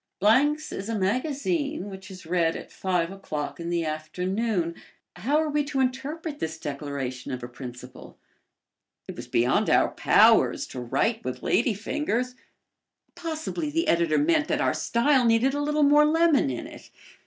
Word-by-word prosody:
"Blank's 285 +10 +3
is 200 +3 -5
a 225 - -1
magazine 280 - -1
which 190 +1 -10
is 185 -3 -11
read 165 -1 +1
at - - -8
five 180 -2 -1
o'clock 155 -7 -5
in 170 0 -4
the 170 -1 0
afternoon." 180 +4 -2 0.4
How 290 +6 +1
were 315 -1 0
we 295 0 +1
to 280 -1 -3
interpret 290 +4 -2
this 160 0 -3
declaration 140 -4 -5
of 125 -1 -5
a - - -4
principle? 125 0 -10 0.9
It - - -7
was - - -8
beyond 120 +1 +2
our - - +4
powers - - +4
to 130 - -7
write 135 - 0
with 130 - -5
ladyfingers. 245 +2 0 0.8
Possibly 320 -1 -4
the 330 +3 -1
editor 170 - +2
meant 315 0 +2
that - - 0
our - - +2
style 255 +3 +2
needed 235 +3 +3
a 290 - -1
little 300 +1 +1
more 295 +1 +6
lemon 320 - +3
in 125 - -4
it. - - -12
225 Hz, 160 wpm, -26 LUFS, -, 0.9 s, more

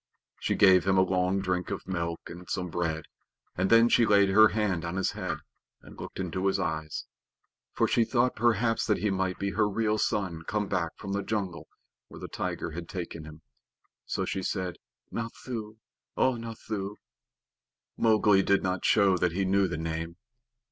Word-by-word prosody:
She - - 0
gave 95 -2 +5
him 95 0 +3
a 95 - +6
long 95 +1 +1
drink 90 -2 -1
of - - -5
milk 85 -3 -2
and 90 +1 -10
some 90 -2 -2
bread, 80 -2 -2 0.5
and 95 +1 0
then 115 +1 +7
she 120 - +4
laid 100 -3 +5
her 110 +3 +7
hand 105 -7 -1
on 85 +1 -4
his 95 - 0
head - - -3 0.5
and - - -13
looked - - -8
into 95 +1 -1
his 95 0 +1
eyes; 80 -3 -3 0.7
for - - +2
she 115 - +3
thought 125 +2 +1
perhaps 115 0 +2
that 105 - +2
he 105 - 0
might 95 -1 -1
be 100 0 -2
her 105 +2 +2
real 110 +1 0
son 90 -7 -1
come 105 -1 -1
back 90 -4 -2
from 100 - -5
the 100 - 0
jungle 95 -6 -3 0.4
where - - -12
the - - -6
tiger 85 - -4
had 85 +1 -7
taken 85 -4 -6
him. 80 +1 -12 0.6
So - - -1
she 95 - -2
said, 90 -2 -3 0.3
"Nathoo, 115 -1 -5 0.4
O 130 - +3
Nathoo!" 110 -3 -5 1.0
Mowgli 105 -3 +4
did 100 0 +2
not 90 -1 -1
show 100 -3 +4
that 90 -1 +1
he 95 +2 0
knew 95 +1 +3
the 85 -3 -4
name. 80 +1 -4
95 Hz, 180 wpm, -28 LUFS, 90-105 Hz, 1.0 s, then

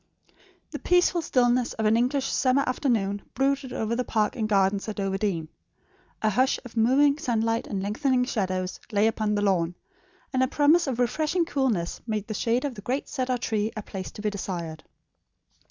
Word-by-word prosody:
The - - -5
peaceful 355 -1 +3
stillness 245 -4 +2
of 220 - -2
an 215 +1 +4
English 260 +4 +1
summer 265 +1 +2
afternoon 220 -6 0
brooded 270 0 0
over 225 0 -1
the 250 - 0
park 215 -2 0
and 220 -3 -2
gardens 195 +1 +2
at 210 - -5
Overdene. 195 -4 -1 0.8
A 215 - +3
hush 255 +6 +2
of 245 - -11
moving 275 +6 +4
sunlight 230 -3 0
and 195 -2 -3
lengthening 250 +5 +1
shadows 185 -6 -2
lay 205 0 +3
upon 215 -1 +1
the 205 - 0
lawn, 175 -4 +1 0.6
and 260 - +2
a 260 - +3
promise 300 +4 +3
of 260 -4 -1
refreshing 305 +8 +1
coolness 255 - -1
made 215 -2 -2
the 215 - -5
shade 235 +5 0
of 280 - -2
the 205 - -9
great 255 +7 -2
cedar 255 -2 -1
tree 220 -2 -1
a 215 - -4
place 190 -2 -6
to 210 - -9
be 210 - 0
desired. 170 -5 -5
225 Hz, 180 wpm, -26 LUFS, 205-260 Hz, 0.8 s, an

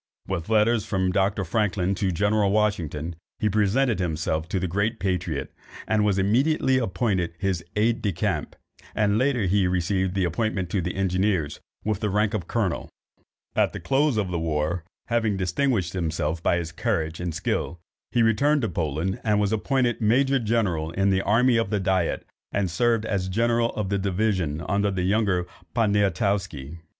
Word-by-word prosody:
With 90 -1 -3
letters 110 0 +3
from 95 -1 0
Dr. 95 +1 +1
Franklin 100 0 0
to 95 -1 0
General 105 +3 +2
Washington, 90 -6 0 0.2
he 110 - 0
presented 110 +4 +2
himself 80 -2 -1
to 95 - 0
the 95 - -1
great 100 +6 -1
patriot, 90 -6 -2 0.3
and 110 -1 +2
was 100 -2 +2
immediately 130 +7 +2
appointed 95 -6 -1
his 95 -2 -1
aid 110 +2 +2
de 100 - 0
camp, 95 -7 -2 0.4
and 105 0 +2
later 130 -3 +1
he 95 0 +2
received 95 +1 0
the 95 - +1
appointment 95 0 -1
to 100 - +1
the 90 +1 -3
engineers, 95 -4 0 0.3
with 105 -3 0
the 105 - -1
rank 105 +1 +1
of 95 -6 -3
colonel. 105 -8 -1 0.7
At - - +2
the - - -5
close 140 -2 +1
of 100 -4 -1
the 85 - -1
war, 80 +2 -1 0.2
having 115 -4 0
distinguished 95 - 0
himself 80 -2 -2
by 85 - +2
his 85 -2 -4
courage 80 0 -2
and 90 -1 -2
skill, 85 +2 -2 0.3
he 120 -2 +3
returned 140 +6 +3
to 110 - 0
Poland, 80 +2 -2
was 105 -2 +2
appointed 120 +1 0
major 135 +5 +3
general 105 -9 0
in 95 +3 +1
the 95 0 +2
army 115 +4 +3
of 115 - 0
the 105 - 0
diet, 95 -3 0 0.3
and 100 -3 0
served 115 +4 +1
as 95 -4 -1
general 115 +3 +2
of 105 -3 -2
division 95 -6 0
under 100 0 +1
the 95 -2 -2
younger 95 -2 +1 0.3
Poniatowski. 100 - 0
100 Hz, 165 wpm, -25 LUFS, 90-110 Hz, 0.7 s, letters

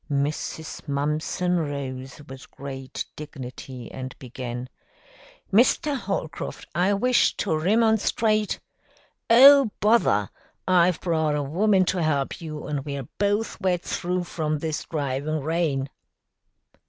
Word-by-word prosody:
Mrs. 150 +3 -3
Mumpson 150 +5 0
rose 140 -2 -5
with 130 -1 -11
great 135 -1 -6
dignity 130 -4 -8
and 130 0 -7
began, 125 -1 -6 0.9
"Mr. 260 +6 +4
Holcroft, 195 - -4
I 185 +5 +2
wish 250 +5 +3
to 175 -6 0
remonstrate 215 +3 +2 0.4
" - - -37
"Oh, 270 +2 +8
bother! 220 +4 +3 0.4
I've 180 -1 +4
brought 160 -4 +1
a 145 - -1
woman 190 +6 +2
to 180 0 0
help 150 +1 0
you, 155 -2 -6
and 145 -2 -3
we're 140 -3 -5
both 205 +2 0
wet 180 -2 +1
through 180 +1 -2
from 155 -3 -2
this 155 +1 -3
driving 145 0 -2
rain." 150 -3 0
155 Hz, 115 wpm, -25 LUFS, 140-190 Hz, 0.9 s, Oh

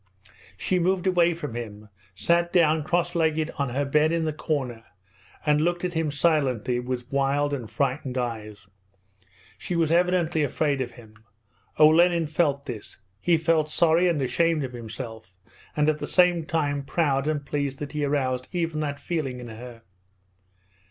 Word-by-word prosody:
She 185 - 0
moved 180 +1 +1
away 175 -2 +3
from 150 -7 -6
him, 105 -3 -7 0.3
sat 170 - +1
down 160 -3 +3
cross 175 +2 0
legged 160 -1 +1
on 140 -2 0
her 140 +4 -1
bed 150 +3 +3
in 165 -1 0
the 155 - -1
corner, 130 -7 -3 0.6
and 150 0 +3
looked 175 +2 0
at 180 - -2
him 160 -2 0
silently 140 -6 +1
with 125 0 -5
wild 140 +1 +1
and 120 -6 -4
frightened 135 -2 -2
eyes. 110 -5 -4 0.9
She 180 - -3
was 165 -2 +1
evidently 175 -2 +2
afraid 145 -1 0
of 120 -2 -4
him. 110 -3 -16 0.5
Olenin 165 +2 +5
felt 145 -2 0
this. 115 -6 -7 0.2
He 170 +6 +3
felt 160 -1 +1
sorry 165 +3 +3
and 170 -4 +1
ashamed 160 +4 +1
of 130 -1 -5
himself, 110 -4 -8 0.4
and 150 0 +3
at 155 0 +1
the - - -4
same 180 -3 +3
time 145 -4 -1
proud 140 -1 0
and 150 -2 -1
pleased 140 -2 -2
that 145 0 -6
he 150 -1 -2
aroused 130 -3 0
even 165 -3 -2
that 145 -2 -3
feeling 140 -7 -3
in 120 -1 -8
her. 115 +1 -10
150 Hz, 165 wpm, -25 LUFS, 130-165 Hz, 0.9 s, Olenin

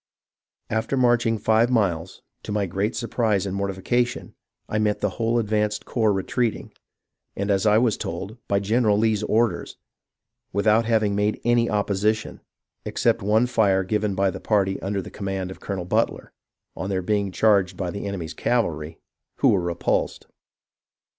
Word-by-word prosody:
After 110 +5 -1
marching 120 -2 +3
five 110 +3 +3
miles, 95 -8 -1 0.2
to - - -7
my 105 -1 0
great 100 +5 -2
surprise 115 -4 0
and 95 -1 -3
mortifica 100 +5 0
tion 125 - -8 0.3
I 110 - -1
met 105 -1 +1
the 105 - 0
whole 115 +1 +2
advanced 105 -1 0
corps 110 -3 +1
retreating, 105 +4 -2 0.6
and, 100 +1 -1
as 100 +2 +2
I 105 0 +5
was 115 -2 +2
told, 95 +7 -5
by 100 - +2
General 110 0 +2
Lee's 110 -1 +2
orders, 110 +2 0 0.7
without 105 +3 +3
having 110 -3 +2
made 105 +1 0
any 120 0 +3
opposi 105 +1 +1
tion, 110 - -9 0.4
except - - +1
one 110 +4 +3
fire 100 -6 +2
given 105 +1 -1
by 95 0 +2
the - - -8
party 95 -3 +1
under 100 0 -2
the - - -10
command 95 -2 -4
of - - -10
Colonel 95 -3 -4
Butler, 90 - -1 0.4
on 95 - -4
their 95 -2 -1
being 100 0 0
charged 100 -3 +2
by 90 -2 -3
the 100 +1 -5
enemy's 85 -5 -5
cavalry, 80 -11 -1 0.4
who - - +3
were 95 - +3
repulsed. 85 -1 -1
105 Hz, 160 wpm, -24 LUFS, 95-110 Hz, 0.7 s, I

